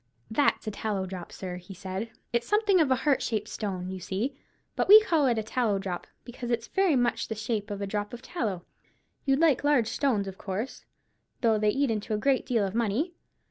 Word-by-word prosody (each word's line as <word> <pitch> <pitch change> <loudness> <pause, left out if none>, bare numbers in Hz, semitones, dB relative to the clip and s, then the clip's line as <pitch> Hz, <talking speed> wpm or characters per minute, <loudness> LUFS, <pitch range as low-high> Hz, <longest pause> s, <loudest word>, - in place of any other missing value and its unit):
"That's 285 +2 +2
a 215 - -2
tallow 200 -2 -2
drop, 185 -2 -7
sir," 180 -2 -6
he 180 +2 -11
said. 190 +4 -5 0.2
"It's 235 0 0
something 415 -4 +4
of 300 - +2
a 260 - +4
heart 280 +1 +2
shaped 215 -3 -1
stone, 185 -3 -4
you 190 - -5
see; 210 +10 -2 0.4
but - - 0
we 420 +2 +11
call 325 -9 +2
it 240 -2 +2
a 220 - 0
tallow 220 -2 0
drop, 190 -2 -4 0.2
because 240 0 -7
it's 235 -1 0
very 385 -6 +3
much 245 -1 +1
the 220 - -3
shape 215 -1 -2
of 205 -1 -4
a - - 0
drop 205 +1 -3
of 240 0 -9
tallow. 210 - -3 0.6
You'd 270 -1 +3
like 310 -4 +3
large 280 -6 +3
stones, 230 -6 +1
of 190 0 -8
course, 205 +6 -4 0.6
though 225 -3 +3
they 210 0 +3
eat 270 +3 +1
into 215 0 -2
a - - 0
great 265 +4 +1
deal 230 -6 +2
of 190 - -4
money? 235 - 0
225 Hz, 220 wpm, -28 LUFS, 200-270 Hz, 0.6 s, we